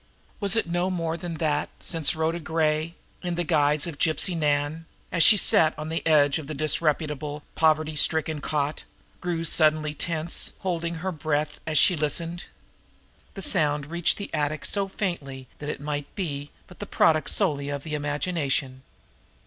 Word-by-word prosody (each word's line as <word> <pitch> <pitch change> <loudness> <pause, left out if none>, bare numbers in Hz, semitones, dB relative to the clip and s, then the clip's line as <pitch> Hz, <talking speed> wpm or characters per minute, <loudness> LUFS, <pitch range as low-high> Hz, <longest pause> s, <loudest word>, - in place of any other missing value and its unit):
Was 200 -1 +1
it 225 - +1
no 175 +2 -1
more 165 -3 -2
than 170 0 -5
that 155 -2 0
since 165 -3 +1
Rhoda 160 +2 -1
Gray, 160 0 -1 0.3
in 175 -1 -3
the 175 - 0
guise 150 -2 +2
of 165 -4 -6
Gypsy 165 +3 +2
Nan, 150 +1 0 0.2
as 170 - +1
she 210 - +8
sat 160 -4 +4
on 155 +1 -5
the 165 - -2
edge 145 -2 +4
of 150 - -8
the 155 - -5
disreputable, 150 -1 -1
poverty 155 -1 +2
stricken 155 0 +2
cot, 150 +1 -2 0.4
grew 175 -2 -2
suddenly 155 -1 +3
tense, 165 +2 -1
holding 170 -2 -2
her 185 +4 -3
breath 150 -2 -2
as 155 -1 0
she 180 +5 +6
listened. 165 +3 -2 0.9
The 195 - -4
sound 150 -6 +2
reached 170 0 +1
the 200 - -7
attic 150 0 -1
so 200 -1 +1
faintly 145 -10 -4
that 150 - -5
it - - -4
might 145 0 -4
be 145 -7 -4 0.2
but 180 - -16
the 205 - -6
product 155 -3 +2
solely 145 -8 +1
of 140 -1 -4
the 155 - -6
imagination. 145 -3 -2
155 Hz, 165 wpm, -25 LUFS, 150-170 Hz, 0.9 s, she